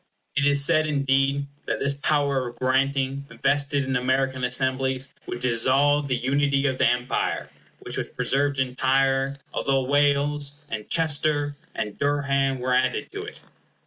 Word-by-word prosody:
It 140 +1 +2
is 140 -1 +4
said, 155 0 +3
indeed, 140 -1 +1 0.2
that - - -1
this 140 0 0
power 140 -2 0
of 120 - -9
granting, 135 +2 0 0.2
vested 140 0 +1
in 130 0 -2
American 130 0 0
Assemblies, 130 +1 0
would - - -4
dissolve 135 +5 +2
the 130 - 0
unity 140 +3 +1
of 130 -2 0
the - - +4
Empire, 125 +1 -1 0.3
which - - -6
was - - -2
preserved 140 0 0
entire, 135 +1 +1 0.2
although 135 -1 +1
Wales, 145 +1 +1 0.2
and 110 -1 -5
Chester, 150 -2 +1 0.2
and 105 -1 -4
Durham 140 -2 +1
were 125 0 -1
added 130 0 0
to 405 +1 -6
it. 430 - -10
135 Hz, 145 wpm, -24 LUFS, 130-145 Hz, 0.3 s, is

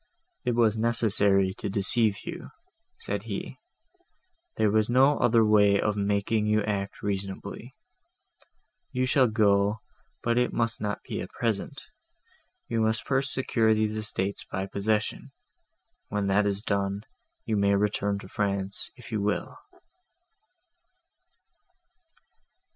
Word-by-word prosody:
"It 120 -1 +1
was 110 -2 +2
necessary 100 -4 +3
to - - -3
deceive 105 +1 +2
you," 175 0 -7 0.5
said 460 - -4
he,—"there 345 - -6
was 110 +1 +2
no 135 +4 +4
other 115 -2 +4
way 105 -2 +4
of 105 -1 0
making 105 +1 0
you 105 0 +2
act 100 -2 -3
reasonably; 100 -1 -5 1.2
you 125 0 0
shall 130 0 +3
go, 105 -1 +2 0.5
but 120 0 +2
it 125 - +1
must 115 -1 +1
not 105 -1 -3
be - - -5
at - - -7
present. 115 -4 -3 0.9
I 115 - 0
must 110 0 0
first 135 +1 +1
secure 115 -4 +2
these 110 0 0
estates 100 -2 -2
by 95 +1 -4
possession: 105 +2 -2 0.7
when 105 -1 -2
that 100 +1 +2
is 100 +1 -2
done, 100 -1 -1 0.4
you 110 - -1
may 100 -1 +3
return 100 0 0
to - - -11
France 100 0 -2
if 125 -3 -13
you 110 -2 -1
will." 105 0 -1
105 Hz, 125 wpm, -27 LUFS, 100-115 Hz, 1.2 s, no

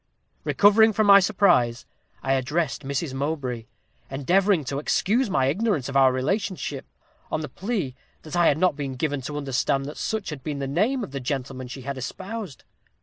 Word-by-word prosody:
"Recovering 215 +2 +5
from 215 +1 +2
my 200 -1 +9
surprise, 180 - +2 0.4
I 135 - +1
addressed 140 +3 -1
Mrs. 140 +1 -3
Mowbray, 135 -5 -3 0.4
endeavoring 175 +6 +2
to 140 +2 -2
excuse 215 - +1
my 135 -8 +2
ignorance 160 - 0
of 135 - -6
our 135 -1 +6
relationship, 145 - -2 0.4
on - - -1
the 150 - -4
plea 190 - -3 0.3
that 155 - -7
I 175 -1 +4
had 145 - +3
not 180 -2 +2
been 140 -3 -4
given 145 +1 -2
to 145 +3 -5
understand 135 -1 0
that 150 - -7
such 215 -5 -3
had 145 -3 -7
been 150 -2 -3
the 140 - -3
name 210 - 0
of 145 - -7
the 140 - -4
gentleman 130 -1 -4
she 130 +2 -8
had 135 +1 -5
espoused. 190 - -6
145 Hz, 180 wpm, -25 LUFS, 135-195 Hz, 0.4 s, my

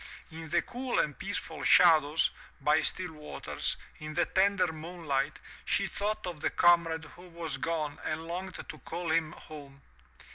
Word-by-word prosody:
In 160 0 -8
the 175 +2 +2
cool 250 +1 -3
and 150 - +1
peaceful 200 +1 -4
shadows, 160 -3 +6 0.3
by 150 +2 +3
still 180 -2 +1
waters, 150 -1 -3 0.2
in 155 0 -7
the 175 - +3
tender 190 -3 +2
moonlight, 155 -4 -2 0.3
she 195 - +1
thought 205 +2 -2
of 175 -4 -5
the - - +1
comrade 170 -2 +4
who 175 +4 -14
was 165 -4 -3
gone 155 -1 -2
and 160 +1 -3
longed 185 +3 -5
to - - -8
call 175 -2 -4
him 160 -1 +1
home. 140 -3 -12
165 Hz, 155 wpm, -30 LUFS, 155-180 Hz, 0.3 s, shadows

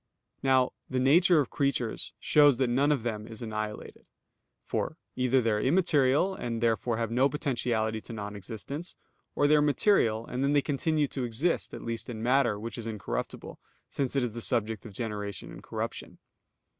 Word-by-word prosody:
Now 130 -1 +3 0.2
the 130 - 0
nature 165 +6 +5
of 135 - -4
creatures 140 -5 -1
shows 145 -4 +5
that 130 -2 +1
none 140 +4 +3
of 140 -6 0
them 110 -2 -3
is 115 +1 -9
annihilated. 110 -1 -5 0.6
For, - - -2 0.2
either 130 0 +2
they 115 -1 +1
are 105 0 +1
immaterial, 150 +1 +3
and 120 -10 -4
therefore 115 0 +1
have 115 -1 -2
no 130 +4 +3
potentiality 120 -7 -1
to 115 - -9
non 105 -1 -5
existence; 115 - -6 0.4
or 145 - +2
they 150 +1 +5
are 150 - +5
material, 140 - +2
and 125 +2 -3
then 140 +1 +2
they 145 -1 +3
continue 150 +1 0
to 130 - -3
exist, 125 +9 0
at - - -8
least 115 0 -4
in 110 -2 -5
matter, 125 -4 +2
which 115 +1 -6
is 115 - -6
incorruptible, 100 - -5 0.3
since 140 -1 -2
it 135 - +2
is 120 - -1
the 115 +2 -6
subject 110 +1 -1
of - - -10
generation 105 -2 -5
and - - -10
corruption. - - -5
120 Hz, 180 wpm, -29 LUFS, 110-140 Hz, 0.6 s, nature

